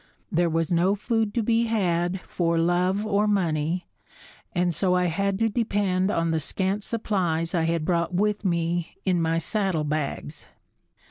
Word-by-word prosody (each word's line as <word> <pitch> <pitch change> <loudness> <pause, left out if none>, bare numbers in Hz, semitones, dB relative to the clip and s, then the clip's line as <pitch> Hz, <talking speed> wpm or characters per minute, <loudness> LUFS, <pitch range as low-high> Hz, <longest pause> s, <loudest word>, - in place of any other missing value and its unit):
There 170 +1 +2
was 165 0 -1
no 180 +4 +3
food 225 0 0
to 235 - +1
be 230 +1 +2
had 180 -4 0
for 170 -1 -1
love 180 +4 +1
or 210 0 +2
money 175 -3 0 0.7
and 175 -1 +1
so 180 +1 +1
I 180 0 +2
had 195 +3 0
to 225 +2 +2
depend 205 -4 0
on 165 -4 0
the 160 - +1
scant 190 +6 -1
supplies 180 -7 -1
I 165 -2 +1
had 165 -1 0
brought 170 0 0
with 205 +3 0
me 170 -2 -1
in 180 -3 +2
my 165 0 +1
saddlebags. 155 -7 -2
180 Hz, 155 wpm, -25 LUFS, 165-205 Hz, 0.7 s, no